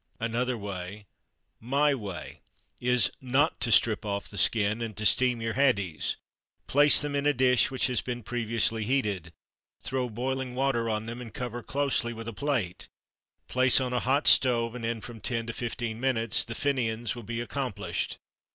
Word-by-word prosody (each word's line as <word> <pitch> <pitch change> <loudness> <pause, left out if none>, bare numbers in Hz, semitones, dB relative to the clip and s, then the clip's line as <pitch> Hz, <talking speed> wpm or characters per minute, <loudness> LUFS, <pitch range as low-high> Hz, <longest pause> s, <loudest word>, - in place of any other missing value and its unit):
Another 120 +2 -1
way 100 0 -6 0.5
my 140 +5 +2
way 100 -8 -7 0.4
is 125 -6 +3
not 135 +5 +1
to 115 - +2
strip 110 0 +4
off 100 -1 -3
the - - -10
skin 105 +3 +2
and 115 -3 -5
to 110 - -3
steam 125 +2 +4
your 115 0 -1
haddies. 105 - +1 0.5
Place 145 +1 +6
them 145 0 -3
in 140 +1 +1
a 145 - +3
dish 125 -1 +4
which 130 -1 0
has 125 -4 +1
been 120 -2 -5
previously 115 -1 0
heated. 105 -9 -1 0.5
Throw 130 -2 -2
boiling 130 +2 -3
water 125 -3 +1
on 110 0 -1
them, 120 +2 -6
and 115 -2 -8
cover 120 0 -5
closely 140 -3 -1
with 115 0 -8
a 115 - -4
plate; 120 -8 -2 0.6
place 130 0 +4
on 125 -1 -2
a 125 - +2
hot 135 +5 +1
stove, 115 -3 +4
and 125 -1 -7
in 115 -1 -2
from 115 -1 -9
10 115 -2 -2
to 120 - -5
15 115 -1 -4
minutes 115 -4 +1
the 115 - -6
Fin'ans 120 -5 -1
will 120 - -7
be 115 +1 -4
accomplished. 125 -1 -3
120 Hz, 175 wpm, -28 LUFS, 110-130 Hz, 0.6 s, Place